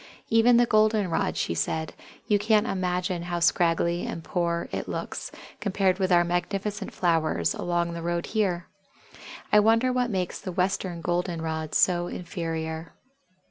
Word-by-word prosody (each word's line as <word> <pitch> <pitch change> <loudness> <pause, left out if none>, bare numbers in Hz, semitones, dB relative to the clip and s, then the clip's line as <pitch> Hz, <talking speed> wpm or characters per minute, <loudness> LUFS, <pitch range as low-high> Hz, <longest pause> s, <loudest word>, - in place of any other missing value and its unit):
"Even 230 +2 +5
the 240 - +5
Golden 215 -4 +2
rod," - - 0
she - - -1
said; 160 - -2 0.3
"you 205 -1 +2
can't 215 +1 +3
imagine 180 -3 -1
how 175 0 -3
scraggly 170 0 +2
and 165 - -5
poor 170 0 -1
it - - -4
looks, - - -5 0.3
compared 195 -2 +1
with 190 -1 +1
our 175 -1 +6
magnificent 195 +4 -2
flowers 160 - +1
along 175 -1 -1
the 170 - -5
road 170 0 -1
here. 185 -6 -1 0.9
I 210 - +8
wonder 230 +4 +3
what 250 -1 +1
makes 185 -4 -2
the 185 - -5
Western 180 -1 -1
Golden 175 +1 -1
rod 160 -1 -3
so 175 -1 +3
inferior." 165 -3 -5
175 Hz, 150 wpm, -26 LUFS, 170-200 Hz, 0.9 s, I